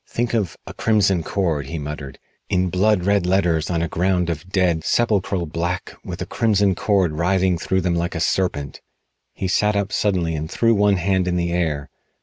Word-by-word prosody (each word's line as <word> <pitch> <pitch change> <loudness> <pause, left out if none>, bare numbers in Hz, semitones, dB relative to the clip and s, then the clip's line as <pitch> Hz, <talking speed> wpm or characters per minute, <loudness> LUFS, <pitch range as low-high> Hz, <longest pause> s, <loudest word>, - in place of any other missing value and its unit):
"Think 120 0 -2
of 105 -8 -1
'A - - -8
Crimson 100 -5 +2
Cord,'" 80 -6 -1
he 80 - -4
muttered, 75 -2 -6 0.3
"in 90 -1 +1
blood 95 +1 +2
red 100 -3 +2
letters 85 -4 +1
on 85 -2 0
a - - 0
ground 90 0 0
of 85 +3 -6
dead, 90 -4 +1
sepulchral 100 -4 +1
black, 85 +3 -3
with - - -5
a - - -6
crimson 100 -3 +2
cord 95 -2 +1
writhing 90 +2 +1
through 95 +2 0
them 90 -1 0
like 85 +1 -2
a - - -2
serpent." 80 -5 -1 0.5
He 95 - -2
sat 105 +3 +2
up 100 0 -1
suddenly 90 -5 0
and 80 0 -4
threw 115 +5 +2
one 105 -1 +3
hand 95 0 +1
in 90 - 0
the 85 -1 0
air. 80 -5 -1
90 Hz, 190 wpm, -21 LUFS, 85-100 Hz, 0.5 s, one